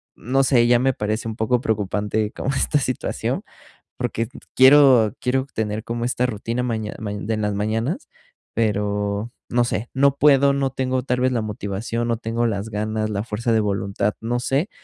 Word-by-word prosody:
no 135 +4 +1
sé. 120 -3 +4
Ya 120 0 +5
me 135 +1 +2
parece 110 +1 -2
un 110 - -4
poco 120 +2 +1
preocupante 105 0 -1
como 135 - -4
esta 140 +2 +1
situación, 130 -2 -2 0.5
porque 115 0 -2
t 130 - -15 0.2
quiero 130 -5 +7
quiero 130 +1 0
tener 110 0 -2
como 115 0 -3
esta 125 0 0
rutina 115 +1 -2
maña 110 -3 -2
mañe 105 -2 -5
de 110 0 -1
las 105 -1 -1
mañanas, 115 - -2 0.5
pero 105 0 -1 0.2
no 120 0 +2
sé. 120 0 -3
No 140 +1 +3
puedo, 140 -1 +5
no 135 -1 0
tengo 130 -1 -1
tal 125 -1 -1
vez 130 0 +2
la 115 - 0
motivación, 110 +3 -3
no 115 -1 0
tengo 115 +1 -1
las 105 0 -3
ganas, 110 +1 -2
la 100 0 -2
fuerza 115 +1 -2
de 110 - +4
voluntad, 100 0 -1
no 120 +2 -1
sé. 135 - 0
115 Hz, 180 wpm, -22 LUFS, 105-125 Hz, 0.5 s, quiero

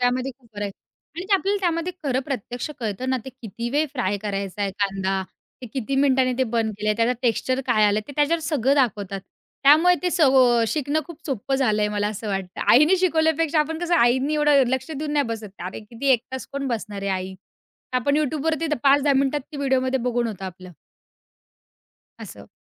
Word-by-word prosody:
त्यामध्ये 250 +2 +1
खूप 245 -3 -25
बरं 205 0 -3
आहे 200 - -3 0.5
आणि 355 - -4
आपल्याला 395 +1 +1
त्यामध्ये 345 -1 -1
खरं 260 -2 +1
प्रत्यक्ष 250 -1 -4
कळतं 225 +3 -3
ना! 260 - +2
ते 265 - -7
किती 235 +2 -5
वेळ 295 +4 +1
फ्राय 220 -8 -1
करायचाय 200 -1 -3
कांदा. 195 -1 0 0.4
ते - - -5
किती 260 +3 -4
मिनिटांनी 265 -2 +3
ते 260 - +3
बंद 225 -2 +1
केलंय, 215 0 +1
त्याचा 230 +2 +2
टेक्स्चर 255 +2 0
काय 215 -1 +3
आलंय? 205 +1 +3
ते 285 - -7
त्याच्यावर 305 +3 +2
सगळं 285 -4 +1
दाखवतात. 205 -7 0 0.4
त्यामुळे 315 +6 +6
ते 360 - +1
सगळं 260 -8 +4
शिकणं 300 +1 0
खूप 340 - -10
सोपं 270 -1 -2
झालंय. 215 -6 +1
मला 205 0 -1
असं 215 +1 -6
वाटतं 195 -2 -4
आईनी 305 +9 +6
शिकवल्यापेक्षा, 320 -3 +2
आपण 315 +1 -2
कसं? 350 0 0
आईनी 260 +2 +3
एवढं 295 -2 +4
लक्ष 260 +4 -2
देऊन 300 0 -4
नाही 290 -2 +2
बसत. 225 -3 -5
अरे, 185 +4 -6
किती 230 +5 -5
1 235 - +2
तास 260 - -5
कोण 280 0 -3
बसणार 210 -4 -4
आहे 200 - -1
आई? 190 0 -3 0.6
आपण 255 +3 +1
YouTubeवरती 310 +2 0
5-10 280 +1 +4
मिनिटात 275 +2 +1
ती 295 - -6
व्हिडिओमध्ये 265 -1 +1
बघून 240 0 0
होतं 200 -4 -6
आपलं. 185 0 -9 1.5
असं. - - -10
260 Hz, 185 wpm, -23 LUFS, 215-295 Hz, 1.5 s, त्यामुळे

